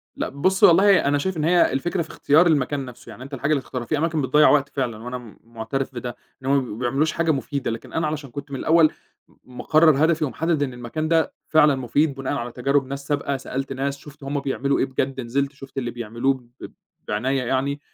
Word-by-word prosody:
لأ - - -3
بُصّ، 185 +8 0
والله 190 +1 +6
أنا 145 +1 +2
شايف 180 +5 -2
إن 155 - -1
هي 175 +2 +4
الفكرة 175 +7 -1
في 160 - -6
اختيار 160 +5 +3
المكان 145 -3 +1
نفْسه، 125 -1 -12
يعني 125 - -10
أنت 140 +2 -11
الحاجة 140 +3 -1
اللي 145 -3 +2
تختارها، 125 -2 -6
فيه 155 - -1
أماكن 160 0 0
بتضيّع 145 +3 +5
وقت 140 -1 +3
فعلًا 125 -6 -3
وأنا 125 0 -8
مُعترف 115 +4 -4
بده، 120 0 -5 0.3
إن - - -5
هُمّ 135 - +3
بيبقوا 125 -5 -5
ما - - -8
بيعملوش 135 +6 +1
حاجة 165 0 +1
مُفيدة، 140 -2 -2
لكن 115 - -8
أنا 160 -1 0
علشان 150 -2 -4
كنت 140 +2 -8
من 135 - -4
الأول 160 -1 +4 0.5
مقرر 155 +3 +3
هدفي 160 -1 +1
ومحدد 155 +2 0
إن 130 -3 -3
المكان 125 +6 -4
ده 165 0 +2
فعلًا 150 -2 +5
مُفيد 140 +3 0
بناءً 135 0 -3
على 120 -4 -3
تجارب 135 +3 +1
ناس 140 +1 -6
سابقة، 140 -2 -1
سألت 135 +1 -4
ناس 140 +1 -2
شُفت 145 0 -14
هُمّ 140 +1 -2
بيعملوا 140 0 -1
إيه - - +2
بجد 130 0 -2
نزلت 135 +4 -1
شُفت 135 -1 -13
اللي 120 -3 -2
بيعملوه 120 +3 -1
ب 125 -1 -12 0.4
بعناية 130 +6 0
يعني، 135 +3 -1
140 Hz, 215 wpm, -23 LUFS, 130-150 Hz, 0.5 s, والله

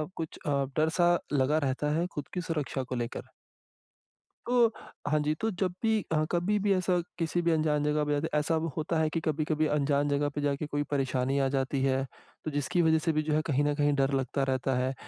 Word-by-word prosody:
कुछ 160 -2 -5
अ, 140 -1 +1
डर 155 +1 +3
सा 175 0 +5 0.2
लगा 140 +2 +3
रहता 140 +3 -1
है 175 - 0
खुद 145 - -5
की 180 - -2
सुरक्षा 145 -3 -2
को - - 0
लेकर। - - -8 1.2
तो, 240 -1 +5 0.4
हाँ 150 +1 +2
जी, 150 +1 +1
तो 225 - +1
जब 185 -2 +1
भी 220 -1 +3
अ, 155 -1 +2
कभी 180 +4 +1
भी 200 0 +1
ऐसा 185 -1 +1 0.2
किसी 170 +1 0
भी 170 0 +2
अनजान 155 -2 +1
जगह 150 0 +1
पे 150 - -1
जाते, 145 +2 0
ऐसा 150 +2 +1 0.2
होता 160 +1 0
है 155 -1 +2
कि 165 - -1
कभी-कभी 155 0 +1
अनजान 145 0 +1
जगह 145 +1 +1
पे 145 - -1
जाके 145 +1 -1
कोई 145 0 -1
परेशानी 135 -1 0
आ 135 - +2
जाती 135 0 0
है, 135 0 +2 0.4
तो 155 - -2
जिसकी 145 +4 0
वज़ह 160 -1 +4
से 165 +1 0
भी 155 - +1
जो 150 0 -1
है 155 - +3
कहीं 145 -1 +1
न 145 - +2
कहीं 145 0 +2
डर 135 0 +2
लगता 135 +1 0
रहता 130 0 0
है, 130 +1 0
150 Hz, 225 wpm, -29 LUFS, 140-165 Hz, 1.2 s, सा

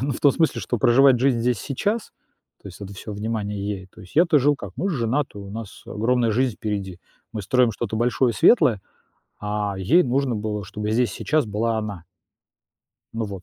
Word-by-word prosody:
ну, 140 0 0
в - - -6
том 140 -2 +5
смысле, 160 -2 +1
что 120 - -2
проживать 130 +3 +5
жизнь 130 -3 +2
здесь 120 -2 +1
и - - -9
сейчас, 205 - -2 0.5
то - - -9
есть 90 - -13
это 100 0 -7
всё 105 +3 -8
внимание 105 -1 -3
ей. 95 -3 -5
То - - -17
есть 95 - -16
я-то 170 -2 +5
жил 145 +2 +3
как: 100 -6 -8
мы 195 +3 -1
ж - - -1
женаты, 120 -1 -1
у 100 0 -9
нас 110 -1 -8
огромная 115 +1 +1
жизнь 125 -1 0
впереди, 100 -4 -4 0.3
мы 110 - -4
строим 125 +3 +2
что-то 110 0 -4
большое, 120 +1 +2
светлое, 120 - +4 0.6
а 105 -1 -2
ей 160 - +4
нужно 130 -1 0
было, 105 -1 -3
чтобы 105 +3 -4
здесь 120 +1 +2
и - - -9
сейчас 155 -3 +1
была 110 +2 -1
она. 105 -6 -5 1.1
Ну 115 -1 -2
вот, 95 -2 -7
115 Hz, 205 wpm, -23 LUFS, 105-130 Hz, 1.1 s, том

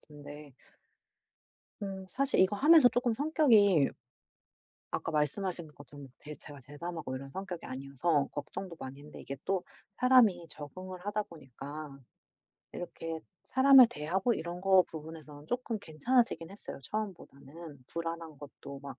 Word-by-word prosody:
근데 145 -1 -12 1.3
음 195 -1 -5
사실 270 +2 +1
이거 190 +2 +4
하면서 305 +1 +7
쪼끔 245 -1 0
성격이 220 - +4 1.0
아까 165 - -3
말씀하신 170 +3 -1
것처럼 145 -1 -12
대 150 0 -9
제가 145 +1 -12
대담하고 145 +1 -6
이런 135 +1 -7
성격이 190 +1 -6
아니어서 140 +3 0
걱정도 170 +4 -6
많이 130 +1 -7
했는데 150 +1 -11
이게 140 - -6
또 190 -2 0 0.4
사람이 225 -10 +5
적응을 185 +5 -8
하다 210 +1 0
보니까 150 - -9 0.8
이렇게 165 -2 -6 0.3
사람을 265 -1 +8
대하고 190 +10 0
이런 175 +1 -5
거 190 0 +6
부분에서는 155 -2 -10
조금 245 0 -2
괜찮아지긴 200 - 0
했어요 200 - -8
처음보다는. 160 - -7
불안한 165 -2 -5
것도 140 -1 -10
막 140 -2 -8
165 Hz, 315 characters per minute, -31 LUFS, 145-200 Hz, 1.3 s, 사람을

